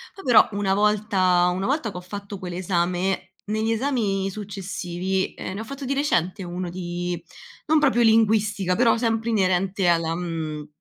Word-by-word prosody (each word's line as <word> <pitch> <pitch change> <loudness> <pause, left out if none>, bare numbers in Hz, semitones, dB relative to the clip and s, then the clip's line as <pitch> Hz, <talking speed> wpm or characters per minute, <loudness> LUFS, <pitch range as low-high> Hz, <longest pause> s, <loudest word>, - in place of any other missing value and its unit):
Poi 390 - -11
però, 245 -3 +6
una 200 -1 +1
volta 195 -4 +3
una 190 +3 -2
volta 270 -6 0
che 180 - -8
ho - - -6
fatto 200 +1 -7
quell'esame, 180 +1 -1
negli 220 +2 -1
esami 220 -6 0
successivi 190 -2 -3
ehm, - - -6
ne - - -5
ho - - -4
fatto 275 +2 -8
di 275 - 0
recente 190 - 0
uno 175 0 -4
di 175 -1 -4 0.5
non 315 +1 +4
proprio 260 -5 +3
linguistica, 215 -4 +3
però 230 -1 +4
sempre 225 -1 0
inerente 190 -2 +1
alla 165 -1 +2
mhmm, 160 -3 -4
195 Hz, 160 wpm, -24 LUFS, 180-220 Hz, 0.5 s, però